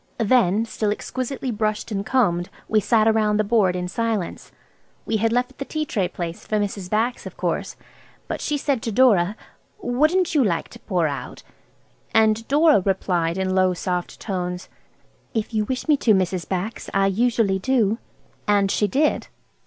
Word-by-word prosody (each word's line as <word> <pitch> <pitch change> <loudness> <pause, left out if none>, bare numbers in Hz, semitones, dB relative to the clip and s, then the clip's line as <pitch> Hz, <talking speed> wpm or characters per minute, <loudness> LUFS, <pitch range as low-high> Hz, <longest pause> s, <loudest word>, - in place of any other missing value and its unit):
Then, 225 -3 +3
still 215 -2 -2
exquisitely 255 +4 -3
brushed 215 0 -2
and 200 -1 -1
combed, 190 -8 +1 0.2
we 215 - +3
sat 220 +1 +3
round 215 -1 +2
the - - +3
board–in 185 -5 +1
silence. 220 -1 -3 0.5
We 220 - 0
had 225 +2 +1
left 245 +3 -1
the - - -2
tea 310 +1 -3
tray 200 -10 0
place 175 -1 -6
for 215 - -1
Mrs. 200 -3 -3
Bax, 230 +4 0
of - - -11
course. - - -2 0.5
But - - -4
she 300 - -1
said 275 -4 0
to 225 - -3
Dora– 210 -5 +4 0.4
"Wouldn't 330 - +1
you 295 -4 +4
like 175 -7 -1
to 235 - -13
pour 180 -7 0
out?" 140 -2 -6 0.7
And 220 0 +3
Dora 295 -4 +5
replied 180 -3 0
in 190 0 0
low, 185 -1 +3
soft 180 0 -3
tones, 180 -3 -4 0.7
"If 220 +1 -2
you 215 -1 +1
wish 255 +6 -3
me 300 -2 +4
to, 220 -5 +3
Mrs. 185 -3 -1
Bax. 195 +4 -3
I 195 0 +4
usually 210 -1 +2
do." 225 -1 +1 0.5
And 200 -1 +3
she 210 - +2
did. 290 +9 +1
215 Hz, 170 wpm, -23 LUFS, 190-240 Hz, 0.7 s, Dora